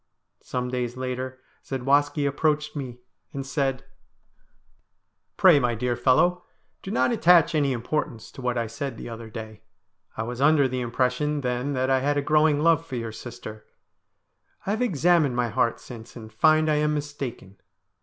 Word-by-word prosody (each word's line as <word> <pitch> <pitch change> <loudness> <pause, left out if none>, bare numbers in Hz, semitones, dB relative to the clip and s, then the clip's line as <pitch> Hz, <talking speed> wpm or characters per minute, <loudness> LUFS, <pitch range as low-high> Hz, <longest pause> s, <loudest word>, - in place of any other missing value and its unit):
Some 125 0 -3
days 125 -1 -3
later 130 0 -4 0.2
Zadwaski 145 +3 +1
approached 150 +2 0
me 130 -4 -5 0.4
and 135 -1 -4
said: 135 -2 -1 0.8
' - - -45
Pray, 175 -6 +7
my 120 -3 0
dear 120 +2 -1
fellow, 175 +9 +3 0.4
do - - -8
not 225 - +2
attach 170 -6 +5
any 145 -3 +2
importance 120 -2 -3
to - - -11
what 125 -1 -1
I 115 - 0
said 115 +2 -5
the - - -7
other 115 -1 -8
day. 110 -1 -9 0.6
I 110 - -1
was 120 +2 -5
under 145 -1 +5
the 130 0 -3
impression 125 +5 0
then 125 +2 -2
that 130 0 0
I 130 - +4
had 145 +2 0
a 145 - 0
growing 150 0 +3
love 165 -1 +4
for 155 -6 -7
your 115 -2 -4
sister. 110 -2 -9 1.0
I 195 - -1
have 220 +3 -1
examined 170 - +2
my 120 -1 0
heart 115 +1 0
since 115 -2 -11
and 110 -2 -10
find 155 +6 +4
I 155 -1 +2
am 150 0 +1
mistaken. 140 -9 -6
130 Hz, 170 wpm, -25 LUFS, 120-150 Hz, 1.0 s, Pray